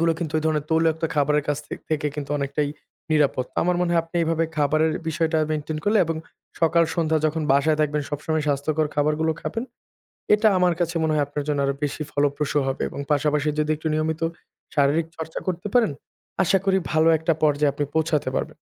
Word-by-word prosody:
এগুলো 165 Hz, 0 st, +3 dB
কিন্তু 160 Hz, -3 st, -4 dB
ওই -, -, -3 dB
ধরনের 150 Hz, -2 st, 0 dB
তৈলাক্ত 160 Hz, 0 st, +3 dB
একটা 165 Hz, -, 0 dB
খাবারের 150 Hz, 0 st, +2 dB
কাছ 145 Hz, 0 st, +1 dB
থে -, -, -5 dB, 0.2 s
থেকে 150 Hz, -1 st, 0 dB
কিন্তু 145 Hz, -2 st, -5 dB
অনেকটাই 140 Hz, +1 st, -1 dB, 0.4 s
নিরাপদ। 145 Hz, -4 st, +2 dB
তো -, -, -39 dB
আমার 180 Hz, 0 st, +2 dB
মনে 180 Hz, -1 st, +1 dB
হয় 170 Hz, -, +4 dB
আপনি 165 Hz, +1 st, -7 dB
এভাবে 165 Hz, 0 st, +1 dB
খাবারের 155 Hz, +2 st, +2 dB, 0.2 s
বিষয়টা 160 Hz, 0 st, +1 dB
মেইনটেইন 155 Hz, 0 st, -2 dB
করলে 210 Hz, +1 st, +3 dB
এবং 165 Hz, -, -2 dB, 0.4 s
সকাল 170 Hz, +1 st, +4 dB
সন্ধ্যা 160 Hz, -2 st, +1 dB
যখন 155 Hz, +1 st, -1 dB
বাসায় 150 Hz, +3 st, +3 dB
থাকবেন 150 Hz, 0 st, +1 dB
সবসময় 150 Hz, +1 st, -1 dB
স্বাস্থ্যকর 150 Hz, +2 st, +1 dB
খাবারগুলো 155 Hz, +2 st, +1 dB
খাবেন। 225 Hz, +10 st, -3 dB, 0.7 s
এটা 215 Hz, +1 st, +4 dB
আমার 180 Hz, -1 st, +3 dB
কাছে 175 Hz, 0 st, -1 dB
মনে 155 Hz, -1 st, +1 dB
হয় 150 Hz, -1 st, +2 dB
আপনার 145 Hz, 0 st, -4 dB
জন্য 145 Hz, -1 st, 0 dB
আরো 140 Hz, -, 0 dB
বেশি 145 Hz, +2 st, -2 dB
ফলপ্রসূ 145 Hz, +1 st, 0 dB
হবে 135 Hz, -, -2 dB
এবং -, -, -8 dB
পাশাপাশি 150 Hz, 0 st, +1 dB
যদি 150 Hz, 0 st, +1 dB
একটু 160 Hz, +1 st, -4 dB
নিয়মিত 155 Hz, +1 st, -1 dB, 0.5 s
শারীরিক 150 Hz, +3 st, +2 dB
চর্চা 160 Hz, 0 st, -5 dB
করতে 180 Hz, +2 st, -2 dB
পারেন। 240 Hz, -9 st, +4 dB, 0.5 s
আশা 195 Hz, +2 st, +3 dB
করি 190 Hz, -1 st, +3 dB
ভালো 160 Hz, 0 st, +3 dB
একটা 160 Hz, +1 st, +1 dB
পর্যায়ে 145 Hz, -1 st, +3 dB
আপনি 145 Hz, 0 st, -1 dB
পৌঁছাতে 160 Hz, -2 st, +1 dB
পারবেন। -, -, -3 dB
155 Hz, 195 wpm, -24 LUFS, 145-165 Hz, 0.7 s, হয়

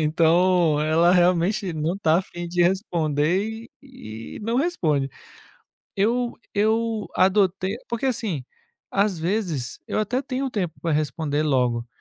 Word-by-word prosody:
então 170 Hz, 0 st, +3 dB
ela 165 Hz, +3 st, +4 dB
realmente 180 Hz, +2 st, +2 dB
não 160 Hz, +4 st, -1 dB
tá 165 Hz, -3 st, +3 dB
afim 175 Hz, -2 st, -6 dB
de 175 Hz, 0 st, +1 dB
responder 175 Hz, -1 st, +1 dB, 0.4 s
e 115 Hz, -, -10 dB
e -, -, -7 dB
não 230 Hz, +3 st, -1 dB
responde. 160 Hz, -, +1 dB, 0.9 s
Eu 235 Hz, +4 st, +1 dB, 0.2 s
eu 220 Hz, +1 st, +1 dB
adotei 190 Hz, +1 st, +2 dB
porque 235 Hz, +2 st, -3 dB
assim, 215 Hz, -, -2 dB, 0.5 s
às 200 Hz, -3 st, +1 dB
vezes 170 Hz, -, -2 dB
eu -, -, -1 dB
até 225 Hz, +5 st, 0 dB
tenho 270 Hz, -1 st, -3 dB
tempo 175 Hz, -9 st, -3 dB
para 165 Hz, -1 st, -1 dB
responder 150 Hz, 0 st, 0 dB
logo, 125 Hz, -5 st, +1 dB
180 Hz, 130 wpm, -24 LUFS, 155-215 Hz, 0.9 s, ela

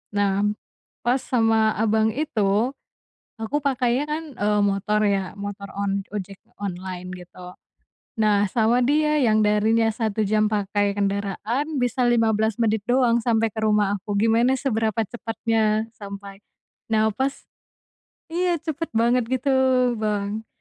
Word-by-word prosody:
nah, 200 Hz, -1 st, +1 dB, 0.6 s
pas 245 Hz, +3 st, +2 dB
sama 225 Hz, -3 st, +2 dB
abang 220 Hz, 0 st, +2 dB
itu, 225 Hz, -5 st, +1 dB, 0.7 s
aku 225 Hz, +6 st, -1 dB
pakainya 255 Hz, -1 st, +1 dB
kan, 310 Hz, +2 st, -2 dB
eee, 210 Hz, -2 st, +1 dB
motor 200 Hz, +2 st, 0 dB
ya 195 Hz, -2 st, 0 dB
motor 200 Hz, 0 st, -6 dB
on 200 Hz, 0 st, -1 dB
ojek 195 Hz, -1 st, -5 dB, 0.2 s
online 185 Hz, -1 st, -5 dB
gitu, 180 Hz, 0 st, -12 dB, 0.7 s
nah 205 Hz, -2 st, +3 dB
sama 230 Hz, +1 st, +3 dB
dia 300 Hz, +2 st, +2 dB
yang 220 Hz, -6 st, +3 dB
darinya 215 Hz, +2 st, +3 dB
1 220 Hz, -1 st, -2 dB
jam 215 Hz, +1 st, +2 dB
pakai 205 Hz, -1 st, 0 dB
kendaraan 200 Hz, +6 st, -1 dB, 0.2 s
bisa 245 Hz, +1 st, +1 dB
15 220 Hz, -2 st, +2 dB
menit 220 Hz, -2 st, +1 dB
doang 245 Hz, -1 st, +3 dB
sampai 225 Hz, -1 st, +2 dB
ke 220 Hz, -, -18 dB
rumah 210 Hz, -1 st, +2 dB
aku 205 Hz, +2 st, -6 dB
gimana 230 Hz, +4 st, +3 dB
seberapa 225 Hz, -5 st, 0 dB
cepatnya 225 Hz, 0 st, -1 dB
sampai, 200 Hz, -1 st, -9 dB, 0.5 s
nah 220 Hz, 0 st, +3 dB
pas, 265 Hz, +5 st, -1 dB, 1.0 s
iya 350 Hz, +1 st, +1 dB
cepet 320 Hz, +1 st, -3 dB
banget 235 Hz, +1 st, +2 dB
gitu 260 Hz, +3 st, 0 dB, 0.5 s
Bang 210 Hz, 0 st, -2 dB
220 Hz, 130 wpm, -23 LUFS, 205-240 Hz, 1.0 s, nah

